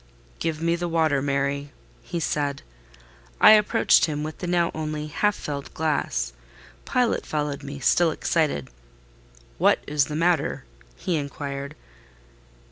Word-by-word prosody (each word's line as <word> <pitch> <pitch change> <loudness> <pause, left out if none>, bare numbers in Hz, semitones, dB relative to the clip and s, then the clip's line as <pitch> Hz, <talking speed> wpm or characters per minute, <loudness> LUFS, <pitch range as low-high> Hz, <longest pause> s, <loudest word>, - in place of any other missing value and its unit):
"Give 165 -1 -2
me 170 0 +2
the 175 0 -3
water, 160 -4 +2
Mary," 140 +1 -1 0.3
he 170 - -4
said. 145 -3 -1 0.8
I - - +9
approached 210 -1 +5
him 150 -2 -3
with 155 0 -6
the 180 - -4
now 175 -1 +2
only 155 -1 -3
half 205 +7 0
filled 140 -2 -6
glass; 145 - -1 0.5
Pilot 250 -2 +1
followed 150 -2 -3
me, 140 0 -7
still 170 +5 +3
excited. 150 - -1 0.9
"What - - +5
is 145 -1 +1
the 150 - -5
matter?" 165 - +1 0.3
he 175 - -1
inquired. 140 -1 -5
150 Hz, 130 wpm, -25 LUFS, 140-165 Hz, 0.9 s, I